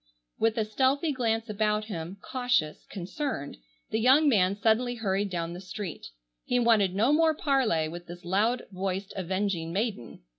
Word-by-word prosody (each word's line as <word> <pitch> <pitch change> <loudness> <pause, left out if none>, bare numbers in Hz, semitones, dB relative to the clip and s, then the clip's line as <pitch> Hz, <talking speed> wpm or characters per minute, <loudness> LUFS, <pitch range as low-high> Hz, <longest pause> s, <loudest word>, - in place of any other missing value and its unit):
With 225 0 +2
a 220 - +1
stealthy 270 +8 +1
glance 225 -4 0
about 210 0 0
him, 180 -2 -6
cautious, 245 -12 -1
concerned, 190 - -4 0.3
the 220 - +1
young 265 +6 +5
man 195 -7 +3
suddenly 240 +3 +2
hurried 200 -3 -1
down 170 -2 -3
the 180 - -8
street. 190 -2 -6 0.4
He 245 - 0
wanted 220 -6 +3
no 230 +8 +3
more 320 0 +4
parley 255 - +1
with 175 +2 -8
this 175 +1 -10
loud 215 +7 +1
voiced 190 +1 -3
avenging 185 -2 -2
maiden. 195 - -3
210 Hz, 155 wpm, -28 LUFS, 185-245 Hz, 0.4 s, young